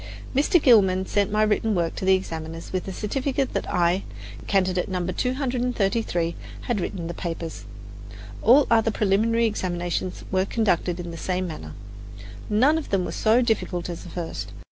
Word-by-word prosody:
Mr. 295 +6 +4
Gilman 190 -9 +5
sent 200 0 0
my 215 +1 +3
written 215 0 +1
work 170 -2 0
to - - -5
the 190 0 +6
examiners 165 -2 -6
with 185 0 -2
a - - -3
certificate 265 +7 -2
that - - -2
I, 175 +2 +2 0.5
candidate 185 -1 +1
No. 180 -2 -2
233, 235 - -1 0.3
had 235 -6 -1
written 175 -1 -4
the 170 - -4
papers. 165 - -5 0.8
All 260 +5 +6
the - - +1
other 225 0 +4
preliminary 220 +3 +2
examinations 180 -3 -2
were 190 0 +2
conducted 185 -5 0
in 175 -1 -5
the 165 - -7
same 185 +2 -2
manner. 80 - -7 0.8
None 265 +10 +4
of 315 - -8
them 190 -2 +1
was - - -5
so 230 +3 +3
difficult 190 -7 -1
as 170 - -7
the - - -10
first. 170 -2 -5
190 Hz, 165 wpm, -24 LUFS, 175-230 Hz, 0.8 s, the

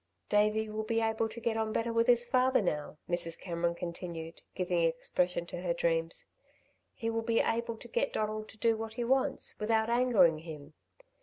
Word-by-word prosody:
"Davey 215 +1 +3
will 215 0 -3
be 225 +1 0
able 225 0 0
to 225 +2 -8
get 230 -1 -1
on 220 -1 0
better 230 +1 -1
with 230 0 +3
his 240 -1 +5
father 260 +1 +3
now," 150 -6 -2
Mrs. 175 -1 -1
Cameron 170 -1 -1
continued, 170 -2 -6
giving 180 -2 0
expression 170 +1 0
to 175 0 -6
her 175 -2 0
dreams. 165 -1 0 0.7
"He 230 0 -2
will 225 0 -1
be 230 0 +1
able 230 0 0
to - - -11
get - - 0
Donald 215 0 -2
to - - -13
do 225 +1 +3
what 220 0 -6
he 240 - -1
wants, 265 +2 +1
without 220 +1 +1
angering 220 -10 +4
him. 155 -2 -9
215 Hz, 185 wpm, -31 LUFS, 170-230 Hz, 0.7 s, his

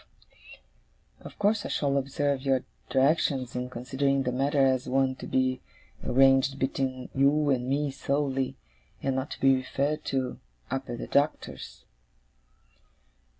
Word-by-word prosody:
Of - - -12
course 205 +1 +2
I - - -5
shall 140 -1 0
observe 140 0 0
your 135 -2 +1 0.3
directions, 135 -2 +1
in 125 0 -3
considering 135 +2 0
the 125 - -1
matter 140 +4 0
as 130 -1 +1
one 135 0 +2
to - - -8
be 130 0 +1 0.4
arranged 135 +1 +4
between 130 -1 -2
you 140 +2 +3
and 125 -1 0
me 145 +1 0
solely, 135 -1 -1 0.5
and 135 -1 0
not 130 +2 -2
to - - -7
be 135 0 +5
referred 140 +4 -1
to, 130 -2 -2 0.3
up 135 0 -3
at 120 - -4
the - - -5
Doctor's. 145 +2 -1
135 Hz, 140 wpm, -28 LUFS, 130-140 Hz, 0.5 s, be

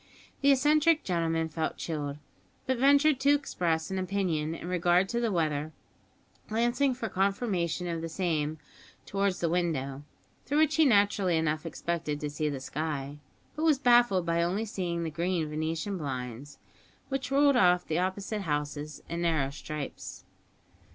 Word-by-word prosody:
The 280 0 +5
eccentric 300 +4 +4
gentleman 165 -2 0
felt 160 0 -3
chilled, 145 -3 -4 0.5
but 260 -2 0
ventured 280 +1 +5
to 285 +2 +4
express 170 - -1
an 190 - -1
opinion 180 -5 -1
in 170 - -8
regard 180 +1 +2
to 235 - -1
the 235 -2 0
weather, 155 -3 -1 0.8
glancing 240 +4 +1
for 235 -2 -4
confirmation 190 -3 -1
of 170 -2 -3
the 165 - -4
same 160 -3 -1 0.5
towards 195 -1 -1
the 170 - +2
window, 155 -6 -1 0.4
through 290 - -1
which 310 0 +3
he 320 - +6
naturally 200 - +3
enough 155 0 -1
expected 165 -2 -3
to 150 -1 -4
see 150 +1 -1
the 140 -2 -4
sky; 145 0 -4 0.4
but 310 - -3
was 315 -3 +4
baffled 240 -8 +4
by 170 0 +1
only 185 +6 0
seeing 175 -5 -3
the 160 - -3
green 170 0 -1
venetian 160 +5 -3
blinds, 130 -1 -5 0.5
which 270 -2 -2
ruled 280 0 +4
off 180 -6 +4
the 160 +2 -1
opposite 195 +3 -2
houses 150 -2 -3
in 170 +1 -4
narrow 155 -5 +1
stripes. 150 0 -7
175 Hz, 155 wpm, -29 LUFS, 155-220 Hz, 0.8 s, he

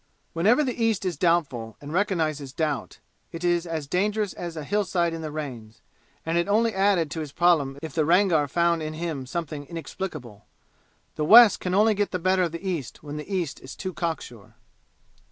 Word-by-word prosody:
Whenever 215 - +3
the 250 -3 -2
East 220 -4 +1
is 180 -2 -1
doubtful, 140 - 0
and 145 +2 -8
recognizes 160 -8 0
doubt, 150 -6 -2 0.3
it 165 +1 -7
is 175 0 +1
as 160 -3 -3
dangerous 205 +6 0
as 170 -2 -6
a 155 - -4
hillside 180 -1 0
in 165 - -5
the 155 - -4
rains, 125 -8 -7 0.5
and 165 +1 +1
it 170 - 0
only 220 +2 +2
added 190 -5 +2
to 165 - -4
his 150 -3 -5
problem 150 -5 +2
if 160 -3 -6
the 160 - +1
Rangar 170 -2 +3
found 170 +3 +1
in 155 0 -4
him 155 -5 -4
something 150 -2 -5
inexplicable. 155 - -7 0.7
The 150 - 0
West 225 +3 +8
can 180 0 -2
only 215 +2 +5
get 205 0 0
the 185 - -2
better 185 +1 +2
of 175 -3 0
the 170 +4 -6
East 160 -10 -4
when 150 0 -6
the 150 +6 -8
East 175 -7 -2
is 130 - -10
too 185 -1 -5
cock 165 -2 -2
sure. 115 -5 -13
170 Hz, 195 wpm, -25 LUFS, 150-185 Hz, 0.7 s, West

